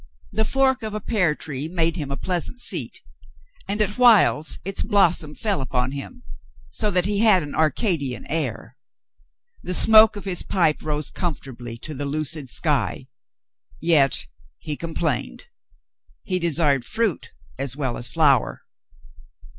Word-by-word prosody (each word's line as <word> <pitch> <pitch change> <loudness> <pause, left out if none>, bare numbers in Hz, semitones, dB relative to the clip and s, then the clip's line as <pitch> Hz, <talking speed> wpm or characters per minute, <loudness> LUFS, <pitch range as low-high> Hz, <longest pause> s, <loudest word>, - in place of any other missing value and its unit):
The 220 +2 0
fork 265 +2 +1
of 215 -1 -5
a - - -2
pear 185 -8 0
tree 145 0 -5
made 165 -1 0
him 150 -6 -5
a 140 - -4
pleasant 180 +7 -2
seat, 165 - -1 0.7
and 200 +2 -2
at 210 +4 -5
whiles 220 -10 +4
its 195 0 -2
blossom 180 -8 +2
fell 205 -9 -1
upon 130 -1 -2
him, 140 0 -8 0.5
so 210 - +1
that 180 -2 +2
he 200 0 0
had 210 -6 +5
an 145 - -8
Arcadian 155 - 0
air. 130 -5 -3 0.8
The 180 - -2
smoke 220 +1 +7
of 205 - -8
his 185 -3 -1
pipe 165 -5 0
rose 150 -1 -3
comfortably 130 -8 -5
to 155 +6 -6
the 145 0 -4
lucid 150 -1 -3
sky. - - 0 0.7
Yet 145 - +3 0.3
he 150 - -5
complained. 155 - -4 0.7
He 185 -1 -1
desired 155 -6 +1
fruit 215 - -2 0.3
as 135 -2 -3
well 130 -5 -3
as 120 - -1
flower. 140 -3 +2
160 Hz, 145 wpm, -22 LUFS, 140-195 Hz, 0.8 s, smoke